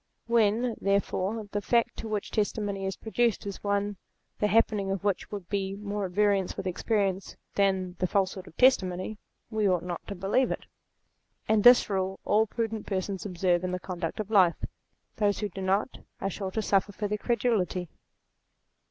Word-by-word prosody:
When, 235 +1 +2
therefore, 200 +2 0
the 205 - -1
fact 235 +3 +2
to 225 - -5
which 210 -2 -3
testimony 205 -2 -1
is 190 - -3
produced 230 -1 0
is 200 -1 -6
one 200 0 0 0.4
the 210 - +3
happening 210 -2 +2
of 195 0 -2
which 200 -3 -1
would 200 -4 -6
be 195 -1 -2
more 205 0 -3
at - - -11
variance 200 -1 +1
with - - -4
experience 195 0 -1 0.2
than 190 -2 +1
the 185 - +1
falsehood 190 -1 -1
of - - -15
testimony, 205 -5 +3 0.3
we 215 -2 +2
ought 180 -2 +1
not 175 -1 -4
to 200 - -5
believe 195 +8 +1
it. - - -4 0.8
And 215 -1 +3
this 245 0 +8
rule 190 -2 -1
all 220 +1 +3
prudent 225 -1 -3
persons 195 0 -2
observe 180 -1 +1
in 185 - -1
the 180 - -2
conduct 175 -1 -4
of 215 0 -4
life 185 -5 +4 0.5
Those 205 -2 +2
who 210 - -2
do 195 +1 -7
not, 195 +6 0 0.2
are 195 - -2
sure 195 +1 -4
to 220 +3 -2
suffer 200 0 +2
for 205 +1 -3
their 210 +1 -2
credulity. 210 -8 0
200 Hz, 180 wpm, -28 LUFS, 190-215 Hz, 0.8 s, this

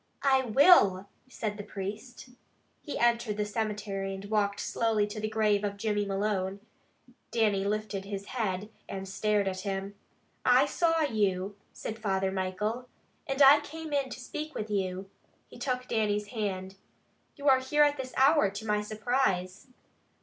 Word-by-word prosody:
"I 265 -1 +4
will!" 215 - +5 0.2
said 215 -5 -4
the 205 - -6
priest. 210 +6 -7 0.5
He 290 - -5
entered 235 -3 +1
the 210 - 0
cemetery, 205 -2 -3
and 195 +1 -8
walked 200 -1 0
slowly 225 -2 +1
to 210 +1 -6
the 215 0 -2
grave 215 -2 +2
of 200 -1 -2
Jimmy 205 -1 -1
Malone. 195 -1 -1 0.7
Dannie 210 -4 +1
lifted 205 -1 -2
his 200 0 -5
head, 210 -3 -2 0.2
and 195 0 -5
stared 205 +1 0
at 185 -1 -2
him. 195 +1 -4 0.5
"I - - +5
saw 330 -1 +1
you," 205 -7 0 0.2
said 220 0 -6
Father 195 -3 0
Michael, 210 +6 -2 0.4
"and 270 0 +3
I 280 +2 +9
came 315 +1 -8
in 275 -2 0
to - - -7
speak 305 +5 -6
with 215 0 -4
you." 190 -1 -2 0.4
He - - -12
took 255 -2 -2
Dannie's 210 -2 0
hand. 195 -4 -4 0.6
"You 285 -1 -5
are 265 -1 +6
here 295 +3 +3
at 290 0 +2
this 260 -1 -6
hour 275 -5 +5
to 200 +3 -7
my 210 -1 +1
surprise." 210 -3 -1
210 Hz, 155 wpm, -29 LUFS, 195-250 Hz, 0.7 s, I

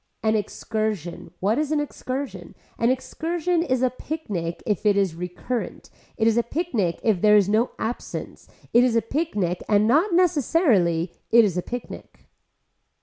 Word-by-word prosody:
An 220 0 +2
excursion, 215 -5 -3
what 210 +7 +2
is 305 -1 -1
an 305 - +2
excursion, 275 -2 -5 0.2
an 230 - +3
excursion 330 +6 -1
is 260 -6 0
a 255 - +3
picnic 205 - -5
if 210 -4 -1
it 205 -2 +3
is 195 -4 +2
recurrent, 180 +8 -5 0.3
it 220 - +1
is 225 0 +3
a - - +4
picnic 235 - -2
if 210 -6 +2
there 210 0 +6
is 200 -3 +3
no 220 +4 +2
absence, 230 +2 -5 0.3
it 240 - +6
is 250 -2 +2
a 230 - +2
picnic 210 - -1
and 210 0 +4
not 310 - +3
necessarily, 275 - +2 0.2
it 235 -1 +6
is 190 -4 -1
a 180 - 0
picnic. 245 +5 -8
225 Hz, 160 wpm, -24 LUFS, 200-285 Hz, 0.3 s, there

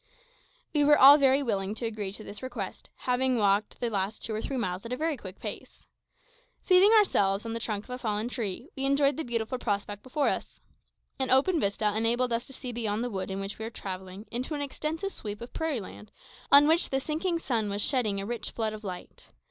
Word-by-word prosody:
We 295 -2 +3
were 295 0 +6
all 280 +3 +9
very 275 0 +4
willing 200 -4 -1
to 235 - -3
agree 215 -4 -3
to 215 - -7
this 205 - -8
request, 240 -7 -6
having 255 0 +1
walked 205 0 +1
the 240 -1 -1
last 200 +1 -2
two 220 - -2
or 215 - -2
three 270 - -3
miles 185 -5 -2
at 230 - -8
a 250 - -1
very 315 +1 0
quick 195 -6 -10
pace. - - -8 0.8
Seating 375 +3 +6
ourselves 205 - +3
on 225 - -3
the 230 - -2
trunk 210 -3 -3
of 250 - -13
a 250 - -4
fallen 215 -2 -1
tree, 240 0 -4
we 270 - -4
enjoyed 280 0 +3
the 320 - -3
beautiful 235 -1 -2
prospect 205 -2 -2
before 270 +4 -1
us. - - -4 0.6
An 265 - 0
open 300 +7 +4
vista 205 -1 0
enabled 235 +2 +1
us 230 +1 -2
to 270 - -8
see 250 -1 -5
beyond 225 -2 -2
the 245 - -3
wood 190 -1 -4
in 190 0 -3
which 195 +2 -5
we 220 - -4
were - - -4
travelling 190 -1 -7
into 255 +6 -3
an 290 - -3
extensive 310 +7 -3
sweep 210 - -1
of 235 - -9
prairie 320 -7 -1
land 210 +2 -11 0.4
on 285 +1 +8
which 325 +2 +3
the 270 - 0
sinking 325 +5 -1
sun 230 -9 -1
was 200 +1 -1
shedding 220 -8 +1
a 195 - -4
rich 235 +2 -3
flood 220 -2 -2
of 215 0 -9
light. 185 -3 -8
235 Hz, 225 wpm, -28 LUFS, 205-270 Hz, 0.8 s, all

